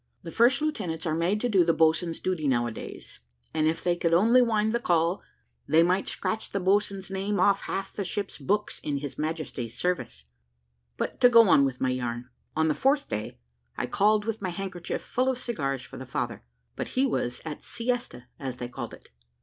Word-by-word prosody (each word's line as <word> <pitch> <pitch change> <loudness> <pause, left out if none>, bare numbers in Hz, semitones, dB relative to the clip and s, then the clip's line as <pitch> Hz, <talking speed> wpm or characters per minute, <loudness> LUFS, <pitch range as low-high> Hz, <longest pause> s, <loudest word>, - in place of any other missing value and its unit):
The 165 - -7
first 255 - +4
lieutenants 195 - -2
are 155 - 0
made 170 +6 +1
to 245 - +1
do 195 -6 +4
the 165 -1 +2
boatswains' 165 +1 +2
duty 180 -5 -1
now 120 -3 +2
a 120 - -3
days, 110 - -9 0.3
and 155 0 +2
if 160 +1 -1
they 175 -1 +2
could 170 -1 +2
only 230 +8 +6
wind 220 -2 +2
the 235 - +1
call, 170 -3 +1 0.5
they 160 +2 +5
might 185 +3 +1
scratch 220 0 -2
the 200 - -2
boatswain's 195 0 +1
name 195 +1 -1
off 200 -1 +4
half 195 - -4
the 200 - -3
ships' 200 +2 -4
books 210 +2 -1
in 145 -2 -2
His 140 -1 -6
Majesty's 150 -7 -4
service. 135 - -2 0.7
But - - -3
to 245 - +8
go 230 -2 +7
on 140 - +6
with 130 -1 -3
my 130 - +1
yarn. 125 0 -4 0.2
On 160 0 +2
the 155 - +3
fourth 280 - +1
day, 105 -10 -4 0.4
I - - -1
called 210 - +2
with 225 -2 -3
my 190 - -1
handkerchief 180 -1 -4
full 255 +1 0
of 260 - 0
cigars 140 - -2
for - - -11
the 130 - -8
father, 120 -2 -3 0.3
but - - -3
he 265 - +4
was 125 - -1
at 155 -2 -5
siesta, 240 - -3
as 130 -3 -5
they 120 - -5
called - - -6
it. - - -22
175 Hz, 205 wpm, -27 LUFS, 145-210 Hz, 0.7 s, to